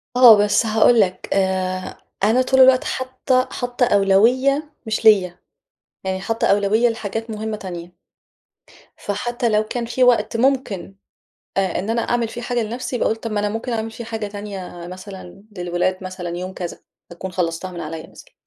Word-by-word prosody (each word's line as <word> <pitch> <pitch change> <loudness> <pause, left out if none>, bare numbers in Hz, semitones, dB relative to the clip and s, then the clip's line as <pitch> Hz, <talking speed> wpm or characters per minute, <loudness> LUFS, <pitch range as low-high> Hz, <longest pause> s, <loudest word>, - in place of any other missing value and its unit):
آه، 240 -4 +9
بس 205 +2 +3
هاقول 220 +2 +4
لك، 185 -2 0
آآ 185 -1 -1 0.3
أنا 230 +5 +4
طول 265 +1 +3
الوقت 260 0 +6
حاطة 260 0 -1
حاطة 245 0 0
أولوية 245 +9 +3 0.2
مش 220 +1 -2
ليَّ، 185 -5 +5 0.7
يعني 190 0 -2
حاطة 225 +3 -1
أولوية 205 +4 +3
لحاجات 225 0 -4
مُهمة 215 0 -4
تانية. 175 -3 -8 1.0
فحتى 240 +4 -2
لو 215 0 +2
كان 235 +2 -4
في 250 +2 +2
وقت 230 -2 +3
ممكن، 230 -8 0 0.6
آآ 190 -3 0
إن 200 +5 -3
أنا 230 0 +1
أعمل 240 -1 0
فيه 240 - -7
حاجة 240 0 -1
لنفسي، 240 +3 -4
باقول 220 - +1
طب 225 0 -6
ما 210 -1 0
أنا 210 - 0
مُمكن 225 +3 -4
أعمل 225 0 -2
فيه 225 +1 -8
حاجة 220 -2 -4
تانية 195 -4 -7
مثلًا 185 +1 -10
للولاد، 180 +1 -1
مثلًا 180 -2 -5
يوم 185 +1 -5
كذا 175 -2 -6 0.3
أكون 180 +2 -7
خلصتها 175 +1 -2
من 175 -1 -7
عليَّ 160 0 -6
مثلًا - - -16
210 Hz, 165 wpm, -21 LUFS, 185-235 Hz, 1.0 s, آه